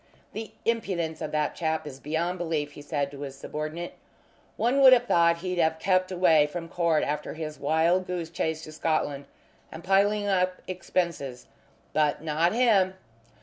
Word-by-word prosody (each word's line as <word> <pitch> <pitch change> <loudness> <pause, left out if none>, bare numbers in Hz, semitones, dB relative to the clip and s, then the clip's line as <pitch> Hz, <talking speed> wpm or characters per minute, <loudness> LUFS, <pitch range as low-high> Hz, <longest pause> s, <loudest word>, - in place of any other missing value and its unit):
"The 220 0 -6
impudence 185 -8 -1
of 150 - -4
that 150 -1 0
chap 160 -2 -2
is 135 -3 -8
beyond 170 +5 -2
belief," 160 -4 -2
he 145 - -11
said 145 -1 -2
to 140 0 -10
his 140 -2 -6
subordinate. 155 +5 -5 0.6
"One 255 +4 +2
would 260 -1 +10
have 245 -1 +4
thought 170 -5 +4
he'd 180 -1 -1
have 160 -1 +2
kept 185 +1 +1
away 165 -5 +4
from 165 +2 -6
court 170 -3 +1
after 150 +1 -3
his 155 -1 -6
wild 165 +5 +2
goose 175 -3 -4
chase 160 -2 -2
to 155 - -9
Scotland 150 -3 -1 0.5
and 160 +1 -9
piling 205 +2 +2
up 185 -2 +1
expenses, 170 -8 -3 0.5
but 150 0 +1
not 160 +2 +1
him! 210 -6 +3
165 Hz, 165 wpm, -27 LUFS, 155-185 Hz, 0.6 s, would